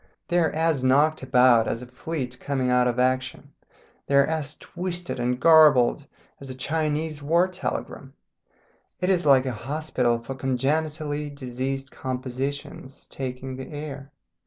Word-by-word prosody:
They 175 Hz, 0 st, +3 dB
are 165 Hz, -, +3 dB
as 160 Hz, -4 st, 0 dB
knocked 145 Hz, +4 st, +3 dB
about 125 Hz, -3 st, +4 dB
as 115 Hz, -, -3 dB
a -, -, -8 dB
fleet 130 Hz, 0 st, -5 dB
coming 130 Hz, -3 st, -1 dB
out 125 Hz, 0 st, +3 dB
of 120 Hz, 0 st, -1 dB
action, 130 Hz, +2 st, -1 dB, 0.6 s
they 140 Hz, -, +1 dB
are 140 Hz, 0 st, +6 dB
as 155 Hz, -2 st, -3 dB
twisted 175 Hz, -4 st, -5 dB
and 125 Hz, +1 st, -1 dB
garbled 150 Hz, -4 st, +5 dB, 0.3 s
as 135 Hz, -, -10 dB
a 130 Hz, -, -6 dB
Chinese 155 Hz, +2 st, -2 dB
war 170 Hz, +5 st, +3 dB
telegram; 185 Hz, 0 st, -5 dB, 0.9 s
it 180 Hz, +1 st, +1 dB
is 175 Hz, -4 st, +1 dB
like 135 Hz, -2 st, +6 dB
an 130 Hz, -, -2 dB
hospital 125 Hz, -1 st, -1 dB
for 115 Hz, +3 st, -7 dB
congenitally 145 Hz, +3 st, -1 dB
diseased 135 Hz, 0 st, -5 dB
compositions 130 Hz, +1 st, -5 dB
taking 130 Hz, 0 st, -6 dB
the 130 Hz, -, -8 dB
air. 145 Hz, -2 st, -7 dB
135 Hz, 145 wpm, -25 LUFS, 130-155 Hz, 0.9 s, are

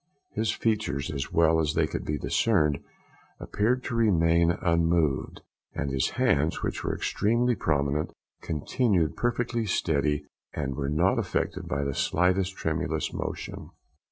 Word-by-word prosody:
His 110 Hz, -, 0 dB
features, 105 Hz, -11 st, -1 dB
as 70 Hz, -2 st, -4 dB
well 80 Hz, -1 st, +4 dB
as 80 Hz, -1 st, 0 dB
they -, -, +3 dB
could -, -, -4 dB
be 75 Hz, -, -2 dB
discerned, 75 Hz, -4 st, +2 dB, 0.6 s
appeared 125 Hz, +5 st, 0 dB
to -, -, -4 dB
remain 85 Hz, -7 st, +3 dB
unmoved, 85 Hz, -4 st, +1 dB, 0.3 s
and 70 Hz, -2 st, -2 dB
his 65 Hz, -1 st, +1 dB
hands, 75 Hz, +3 st, +2 dB
which -, -, -2 dB
were -, -, -1 dB
extremely 120 Hz, +4 st, +1 dB
prominent, 75 Hz, -3 st, 0 dB, 0.3 s
continued 85 Hz, -, 0 dB
perfectly 120 Hz, -1 st, -1 dB
steady, 75 Hz, -4 st, 0 dB, 0.3 s
and 70 Hz, -3 st, -2 dB
were 70 Hz, 0 st, -2 dB
not 85 Hz, +6 st, +2 dB
affected -, -, -2 dB
by 70 Hz, +2 st, -1 dB
the 70 Hz, -1 st, -2 dB
slightest 90 Hz, +5 st, +1 dB
tremulous 80 Hz, -1 st, -2 dB
motion. -, -, -5 dB
80 Hz, 135 wpm, -27 LUFS, 75-100 Hz, 0.6 s, well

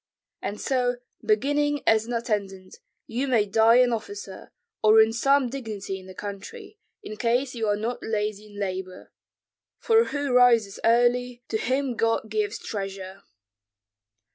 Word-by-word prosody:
And 205 Hz, -, -4 dB
so, 250 Hz, -2 st, 0 dB, 0.3 s
beginning 290 Hz, -7 st, +1 dB
as 220 Hz, 0 st, +3 dB
an 240 Hz, -, -4 dB
attendant, 200 Hz, -5 st, -3 dB, 0.3 s
you 255 Hz, +5 st, -3 dB
may 230 Hz, -5 st, +3 dB
die 225 Hz, +3 st, +4 dB
an 250 Hz, -1 st, +4 dB
officer, 205 Hz, -3 st, -7 dB, 0.3 s
or 215 Hz, +1 st, +6 dB
in 220 Hz, 0 st, +5 dB
some 275 Hz, +3 st, +3 dB
dignity 215 Hz, -7 st, -5 dB
in 185 Hz, -, -14 dB
the 185 Hz, -, -11 dB
country, 400 Hz, -, -8 dB, 0.2 s
in 215 Hz, -, -8 dB
case 245 Hz, +4 st, 0 dB
you 225 Hz, -3 st, -2 dB
are 205 Hz, -, +2 dB
not 230 Hz, +4 st, -3 dB
lazy 210 Hz, -1 st, -3 dB
in 205 Hz, -1 st, -12 dB
labor; 185 Hz, -2 st, -5 dB, 0.7 s
for 455 Hz, 0 st, +3 dB
whoso 285 Hz, -3 st, -2 dB
rises 235 Hz, -5 st, +4 dB
early, 245 Hz, +1 st, +2 dB
to 220 Hz, -, 0 dB
him 260 Hz, +1 st, -1 dB
God 225 Hz, -1 st, 0 dB
gives 215 Hz, 0 st, -1 dB
treasure." 195 Hz, -1 st, -6 dB
225 Hz, 145 wpm, -25 LUFS, 205-250 Hz, 0.7 s, or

